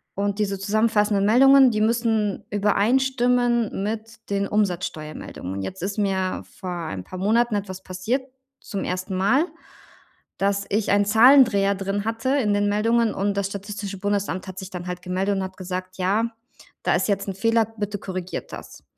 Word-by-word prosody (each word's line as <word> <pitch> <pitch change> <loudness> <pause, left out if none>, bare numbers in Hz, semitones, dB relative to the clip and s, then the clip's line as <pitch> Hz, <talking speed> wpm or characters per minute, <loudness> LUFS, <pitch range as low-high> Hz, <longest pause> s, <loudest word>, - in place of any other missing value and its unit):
und 200 +1 -1
diese 200 -2 0
zusammenfassenden 210 0 +2
Meldungen, 265 +4 +7
die 215 -1 -1
müssen 220 -2 +1
übereinstimmen 240 +1 +1
mit 225 +1 -6
den 200 0 0
Umsatzsteuermeldungen. 155 - -3
Jetzt 175 - -6
ist 200 +2 -3
mir 190 -2 -1 0.2
vor 185 - -5
ein 165 - -5
paar 185 - -8
Monaten 225 +3 +2
etwas 190 -2 -4
passiert, 215 +9 -2 0.4
zum 200 -3 -4
1. 185 +1 -3
Mal, 235 - +3 0.9
dass 200 0 0
ich 210 +1 0
ein 205 0 +4
Zahlendreher 220 -3 +6
drin 195 +1 -3
hatte 225 +3 -2
in 260 -7 +2
den 205 0 +1
Meldungen 225 +2 +2
und 200 +1 -1
das 200 -1 0
Statistische 200 0 -6
Bundesamt 200 -2 -2
hat 185 0 -8
sich 190 - -7
dann 180 -1 -6
halt 180 0 -5
gemeldet 190 +2 -1
und 190 - -1
hat 190 0 -7
gesagt: 185 0 -5
„Ja, 205 +5 +1 0.5
da - - +2
ist - - 0
jetzt 200 0 0
'n 190 - -4
Fehler, 225 +2 +2
bitte 205 -1 -3
korrigiert 185 -1 -6
das.“ - - -10
205 Hz, 165 wpm, -23 LUFS, 190-225 Hz, 0.9 s, Meldungen